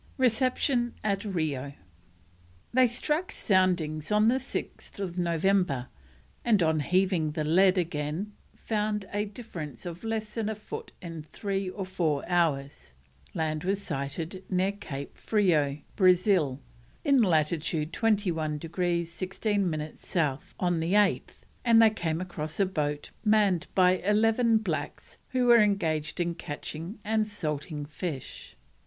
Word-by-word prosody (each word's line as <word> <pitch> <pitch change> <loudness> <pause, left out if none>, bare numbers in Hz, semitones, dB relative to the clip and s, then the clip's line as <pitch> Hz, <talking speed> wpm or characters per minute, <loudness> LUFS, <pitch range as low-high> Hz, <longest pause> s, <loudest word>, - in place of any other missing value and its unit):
RECEPTION 255 -1 +2
AT 200 -1 0
RIO. 155 -9 -2 1.0
They 255 0 +6
struck 300 +9 -1
soundings 175 -5 +1
on 210 +1 +4
6th 215 -7 -3
November, 175 -5 +1 0.5
and 210 -6 +3
on 160 -1 +2
heaving 180 -1 +1
the 155 - -1
lead 185 +5 +4
again 165 +4 -2 0.2
found 210 -2 -2
a 205 +1 0
difference 185 - -8
of 175 +2 -7
less 220 -1 -3
than 220 -2 -1
a 220 - -2
foot 210 - -8
in 165 -2 -6
three 195 +4 -3
or 190 +1 -5
four 165 -6 -1
hours. 145 - 0 0.4
Land 155 -1 -1
was 195 +2 0
sighted 160 +7 -4
near 185 +1 +2
Cape 145 -9 -7
Frio, 160 -10 +2 0.2
Brazil, 180 -7 +3 0.5
in 280 -3 +5
latitude 160 -3 +1
21 180 -9 +1
degrees 170 +1 -1
16 195 +2 -1
minutes 155 -1 -6
South, 150 -6 -1
on 175 -2 +1
the 165 +3 0
8th, 205 -1 +2 0.2
and 230 -2 +6
they 225 -1 +7
came 165 -6 -2
across 170 -3 -5
a 200 - +5
boat 150 -5 -2
manned 210 -5 +3
by 185 -1 +5
eleven 225 +3 +3
blacks 165 -9 -4
who 255 -1 +1
were 240 -2 +7
engaged 160 -7 0
in 175 -1 0
catching 165 +3 -6
and 215 0 +1
salting 150 -5 -3
fish. 145 - -6
180 Hz, 130 wpm, -28 LUFS, 155-210 Hz, 1.0 s, they